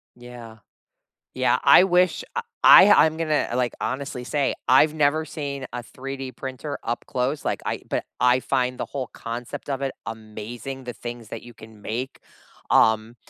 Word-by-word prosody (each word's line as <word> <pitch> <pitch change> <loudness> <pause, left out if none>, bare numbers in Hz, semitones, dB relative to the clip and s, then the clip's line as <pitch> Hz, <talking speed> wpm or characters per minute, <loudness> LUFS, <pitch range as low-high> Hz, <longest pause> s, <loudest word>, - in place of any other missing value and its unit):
Yeah. 120 -2 -12 0.8
Yeah. - - +2
I 180 - +8
wish 180 - +2
I 470 - 0 0.2
I 205 -3 +9
I'm 160 0 -1
gonna, 155 -2 0
like, 125 -1 0
honestly 130 0 -4
say, 140 +2 0 0.2
I've 150 +4 +5
never 155 +1 +1
seen 140 -3 -5
a 125 -1 -5
3D 135 +1 -7
printer 135 +2 -6
up 120 +1 -3
close, 130 +4 -2
like, - - -2
I - - -3
but - - -2 0.2
I 125 +1 +4
find 125 0 -1
the - - -3
whole 135 -3 -5
concept 120 +5 -7
of 135 -1 -2
it 135 -1 -1
amazing, 115 +4 -7
the 125 - -5
things 120 -2 -8
that - - -7
you 120 - -12
can 110 -1 -15
make. 120 +6 -5 0.5
Um, 110 +1 +3
130 Hz, 165 wpm, -24 LUFS, 120-140 Hz, 0.8 s, I